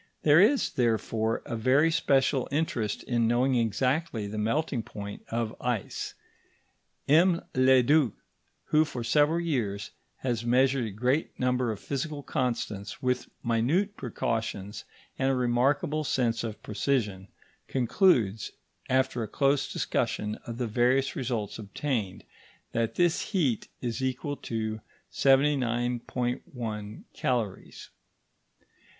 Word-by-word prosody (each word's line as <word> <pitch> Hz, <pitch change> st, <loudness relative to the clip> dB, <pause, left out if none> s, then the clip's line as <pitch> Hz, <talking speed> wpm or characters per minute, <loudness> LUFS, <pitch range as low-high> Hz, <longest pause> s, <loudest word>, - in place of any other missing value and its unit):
There 150 Hz, +1 st, +6 dB
is, 255 Hz, +7 st, +3 dB
therefore, 115 Hz, -2 st, 0 dB
a -, -, -4 dB
very 130 Hz, +8 st, +3 dB
special 135 Hz, -3 st, +2 dB
interest 140 Hz, -8 st, -1 dB
in 120 Hz, -2 st, +1 dB
knowing 125 Hz, +3 st, +2 dB
exactly 125 Hz, +1 st, 0 dB
the 105 Hz, +1 st, -4 dB
melting 120 Hz, +4 st, 0 dB
point 100 Hz, -3 st, -8 dB
of 115 Hz, -1 st, -2 dB
ice. 120 Hz, -5 st, -3 dB, 0.9 s
M. 170 Hz, +4 st, +4 dB
Leduc, 130 Hz, 0 st, +4 dB, 0.5 s
who 155 Hz, +1 st, +4 dB
for 130 Hz, -6 st, -5 dB
several 150 Hz, +6 st, +3 dB
years 115 Hz, -, -2 dB, 0.3 s
has 120 Hz, -3 st, -1 dB
measured 130 Hz, +1 st, +3 dB
a -, -, -6 dB
great 125 Hz, +9 st, -1 dB
number 125 Hz, -2 st, +1 dB
of 105 Hz, -, -5 dB
physical 145 Hz, +1 st, -4 dB
constants 115 Hz, -7 st, -3 dB
with 125 Hz, 0 st, 0 dB
minute 140 Hz, -, +1 dB
precautions 110 Hz, -, -3 dB, 0.3 s
and 135 Hz, -, +2 dB
a 135 Hz, -, +2 dB
remarkable 135 Hz, +6 st, +1 dB
sense 120 Hz, -5 st, 0 dB
of 110 Hz, -2 st, -6 dB
precision, 105 Hz, -5 st, -1 dB, 0.4 s
concludes, 120 Hz, -, +2 dB, 0.4 s
after 130 Hz, -2 st, +1 dB
a 110 Hz, -, -2 dB
close 140 Hz, +4 st, +1 dB
discussion 105 Hz, 0 st, -1 dB
of 115 Hz, -1 st, -5 dB
the 125 Hz, -, -1 dB
various 125 Hz, +4 st, +2 dB
results 120 Hz, -5 st, -3 dB
obtained, 105 Hz, -2 st, -3 dB, 0.5 s
that 115 Hz, -1 st, -1 dB
this 175 Hz, -2 st, +2 dB
heat 145 Hz, -, 0 dB
is 120 Hz, 0 st, -3 dB
equal 130 Hz, +3 st, -2 dB
to 110 Hz, -1 st, -3 dB, 0.3 s
79.1 125 Hz, -4 st, 0 dB
calories. 115 Hz, -6 st, -3 dB
125 Hz, 115 wpm, -28 LUFS, 115-140 Hz, 0.9 s, There